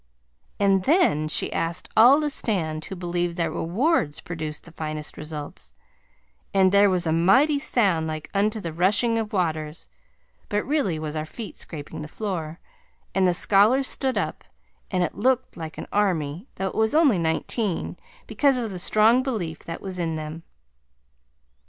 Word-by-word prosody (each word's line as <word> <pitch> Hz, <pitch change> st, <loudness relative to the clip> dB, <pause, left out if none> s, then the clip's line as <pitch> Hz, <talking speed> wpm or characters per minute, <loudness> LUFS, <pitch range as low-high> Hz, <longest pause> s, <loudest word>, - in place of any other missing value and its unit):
And 195 Hz, -2 st, +3 dB
then 155 Hz, -, +3 dB
she 155 Hz, -, -1 dB
asked 170 Hz, +2 st, -2 dB
all 250 Hz, +6 st, +7 dB
to 300 Hz, -, 0 dB
stand 160 Hz, -, -2 dB
who 195 Hz, -, -6 dB
believed 175 Hz, -1 st, -2 dB
that 165 Hz, -2 st, 0 dB
rewards 180 Hz, -, 0 dB
produced 155 Hz, -3 st, -5 dB
the 170 Hz, -, -13 dB
finest 155 Hz, -1 st, -5 dB
results, 150 Hz, -1 st, -8 dB, 0.8 s
and 190 Hz, -1 st, +5 dB
there 200 Hz, 0 st, +5 dB
was 180 Hz, -2 st, +1 dB
a 160 Hz, -, +1 dB
mighty 260 Hz, -, +4 dB
sound 195 Hz, -, +1 dB
like 155 Hz, -1 st, -5 dB
unto 210 Hz, +2 st, +1 dB
the 165 Hz, -5 st, -5 dB
rushing 215 Hz, +7 st, +2 dB
of 220 Hz, -2 st, -4 dB
waters, 160 Hz, -4 st, -2 dB, 0.6 s
but 205 Hz, 0 st, -1 dB
really 275 Hz, -, 0 dB
was 155 Hz, 0 st, -5 dB
our 155 Hz, -, -2 dB
feet 220 Hz, +6 st, -7 dB
scraping 150 Hz, -1 st, -7 dB
the 150 Hz, -, -6 dB
floor, 170 Hz, -4 st, -4 dB, 0.5 s
and 190 Hz, -1 st, +3 dB
the 180 Hz, -, +3 dB
scholars 215 Hz, +9 st, +4 dB
stood 265 Hz, -1 st, -1 dB
up, -, -, -2 dB, 0.5 s
and 185 Hz, -2 st, +1 dB
it -, -, -2 dB
looked 255 Hz, +3 st, 0 dB
like 160 Hz, -1 st, -7 dB
an -, -, -5 dB
army, 180 Hz, -, 0 dB
though 190 Hz, 0 st, -2 dB
it -, -, -10 dB
was 220 Hz, +5 st, +1 dB
only 285 Hz, -, +4 dB
nineteen, 170 Hz, +4 st, -1 dB, 0.3 s
because 280 Hz, -3 st, +2 dB
of 230 Hz, -4 st, -3 dB
the 185 Hz, -, -5 dB
strong 220 Hz, +7 st, +4 dB
belief 200 Hz, -, -3 dB
that 165 Hz, -, -6 dB
was 190 Hz, -2 st, -6 dB
in 165 Hz, -2 st, -1 dB
them. 155 Hz, +1 st, -6 dB
185 Hz, 165 wpm, -24 LUFS, 160-220 Hz, 0.8 s, all